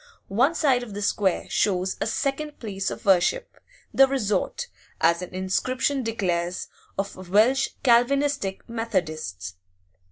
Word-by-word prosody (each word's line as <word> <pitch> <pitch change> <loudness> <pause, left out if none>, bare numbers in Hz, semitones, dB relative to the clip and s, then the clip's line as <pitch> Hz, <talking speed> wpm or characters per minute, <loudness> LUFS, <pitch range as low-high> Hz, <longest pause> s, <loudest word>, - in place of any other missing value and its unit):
One 255 +11 +2
side 270 -7 +3
of 220 -5 -8
the 205 - -4
square 200 -2 +1
shows 190 -2 0
a - - +1
second 280 +6 -2
place 195 -4 -3
of - - -8
worship, 195 - +2 0.3
the 270 - +6
resort, 265 - -1 0.3
as 170 +1 +3
an 180 - -7
inscription 255 +9 0
declares, 180 -6 -2 0.3
of 195 -2 -5
'Welsh 240 +8 +4
Calvinistic 260 -3 +2
Methodists. 155 - -3
210 Hz, 125 wpm, -25 LUFS, 185-265 Hz, 0.3 s, the